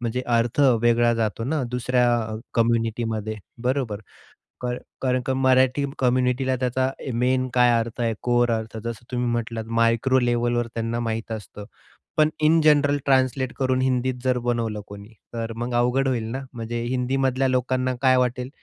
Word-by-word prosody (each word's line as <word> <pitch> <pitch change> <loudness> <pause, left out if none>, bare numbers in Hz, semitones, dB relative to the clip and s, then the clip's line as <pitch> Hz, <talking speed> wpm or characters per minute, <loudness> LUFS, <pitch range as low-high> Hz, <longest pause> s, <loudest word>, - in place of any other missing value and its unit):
म्हणजे 120 +1 -2
अर्थ 120 +3 +1 0.2
वेगळा 120 0 +3
जातो 115 0 -2
ना 145 +1 -1
दुसऱ्या 125 0 +1
अ, 110 0 -5 0.2
कम्युनिटीमध्ये 115 -2 0 0.3
बरोबर. 125 -5 -1 0.6
क 125 - -4 0.4
कारण 130 -1 +1
का 130 - 0
मराठी 130 +1 +3
कम्युनिटीला 130 +1 +1
त्याचा 130 +1 0 0.2
मेन 130 +2 +1
काय 125 -1 +5
अर्थ 115 +1 -4
आहे? 115 -1 +1
कोर 120 0 +2
अर्थ 110 0 -3
जसं 115 0 -6
तुम्ही 125 -1 -1
म्हटलात 115 -1 -3
मायक्रो 115 +3 +3
लेव्हलवर 120 -1 0
त्यांना 115 +1 -2
माहित 115 -1 -3
असतं. 105 -1 -7 0.5
पण 155 0 +5
इन 160 +2 +5
जनरल 145 -2 +4
ट्रान्सलेट 130 -1 +1
करून 130 -1 +1
हिंदीत 130 -1 0
जर 130 -1 +2
बनवलं 115 -3 -1
कोणी, 100 +2 -11 0.2
तर 115 -1 -4
मग 120 +1 -3
अवघड 125 +3 +2
होईल 120 -4 0
ना. 135 +2 -4
म्हणजे 115 0 -4
हिंदी 125 +2 -1
मधल्या 135 0 +1
लोकांना 130 0 0
काय 130 -1 +4
वाटेल, 125 0 0
125 Hz, 160 wpm, -24 LUFS, 115-130 Hz, 0.6 s, काय